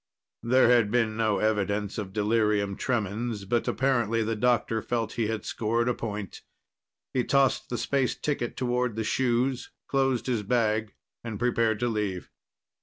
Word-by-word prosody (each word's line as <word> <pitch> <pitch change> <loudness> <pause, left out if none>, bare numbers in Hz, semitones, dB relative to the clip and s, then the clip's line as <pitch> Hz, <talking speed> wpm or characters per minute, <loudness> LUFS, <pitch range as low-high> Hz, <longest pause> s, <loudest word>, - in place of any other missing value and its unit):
There 125 +1 +4
had 120 -4 +4
been 115 -1 +1
no 110 -2 +1
evidence 105 -1 0
of 100 -3 -5
delirium 105 -1 +1
tremens, 110 -2 -2
but 120 +4 0
apparently 120 -3 +1
the 110 +1 -1
doctor 115 -1 +1
felt 115 -2 -2
he 115 -3 -1
had 110 -1 -3
scored 115 +2 0
a 125 - +2
point. 105 -4 -6 0.7
He 125 - +1
tossed 135 0 +2
the 120 - -2
space 135 -1 0
ticket 140 -5 -3
toward 125 -2 0
the 110 - -2
shoes, 125 +2 0 0.2
closed 135 -4 +1
his 120 -4 0
bag, 110 -1 0 0.3
and 115 -3 -5
prepared 115 -2 +1
to 120 - +2
leave. 105 -5 -3
115 Hz, 155 wpm, -27 LUFS, 105-125 Hz, 0.7 s, There